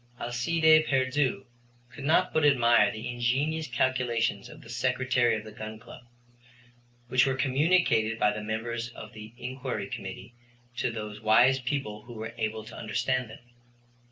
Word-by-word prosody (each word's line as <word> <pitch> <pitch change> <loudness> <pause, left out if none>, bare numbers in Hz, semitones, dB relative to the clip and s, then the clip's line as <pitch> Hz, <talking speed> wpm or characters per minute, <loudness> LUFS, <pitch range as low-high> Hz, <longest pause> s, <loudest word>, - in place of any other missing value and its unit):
Alcide 155 +6 +3
Pierdeux 130 0 +1 0.5
could 130 - -10
not 175 +4 +3
but 155 - +2
admire 120 -5 +5
the 110 0 -6
ingenious 135 +6 -1
calculations 120 -5 0
of - - -13
the 115 - -14
Secretary 125 -1 +1
of 110 - -5
the 110 - -10
Gun 110 0 -7
Club, 120 +2 -14 1.0
which 130 +3 +3
were 135 - +1
communicated 135 -5 +2
by 105 - +3
the 105 0 -5
members 115 +2 -3
of - - -10
the 110 0 -10
Inquiry 130 +1 -4
Committee 100 +3 -8 0.4
to - - 0
those 105 -2 -6
wise 120 +5 +5
people 120 -5 -3
who 120 - -10
were 110 0 -6
able 110 0 -2
to - - -11
understand 120 +3 -1
them. 110 - -13
120 Hz, 155 wpm, -28 LUFS, 110-130 Hz, 1.0 s, admire